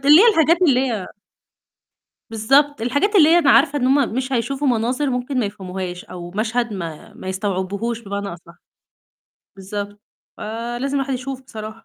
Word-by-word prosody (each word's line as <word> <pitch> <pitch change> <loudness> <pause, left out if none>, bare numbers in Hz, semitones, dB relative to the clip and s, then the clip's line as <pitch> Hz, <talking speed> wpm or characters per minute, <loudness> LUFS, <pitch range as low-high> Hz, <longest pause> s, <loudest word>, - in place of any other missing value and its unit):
اللي 300 +5 +9
هي 470 - +7
الحاجات 335 -1 +3
اللي 265 -7 +4
هي 205 -5 -3 1.2
بالضبط 270 +6 +2
الحاجات 285 - 0
اللي 315 -5 +7
هي 340 +1 +6
أنا 290 -5 +4
عارفة 290 0 +4
إن 255 - 0
هم 270 -4 +2
مش 260 +1 -2
هيشوفوا 270 +4 -1
مناظر 250 +4 0
ممكن 250 +2 -2
ما 215 - 0
يفهموهاش، 185 -2 -6
أو 175 -1 -9
مشهد 225 +3 -1
ما 165 -5 -7
ما 185 - -8
يستوعبوهوش 200 +4 -2
بمعني 200 -1 -5
أصح، 170 0 -14 1.0
بالضبط، 205 +1 -6 0.4
ف - - -12 0.4
لازم 275 +2 -2
الواحد 270 -1 -1
يشوف 260 +1 -5
بصراحة. 220 -4 -8
235 Hz, 160 wpm, -20 LUFS, 200-275 Hz, 1.2 s, اللي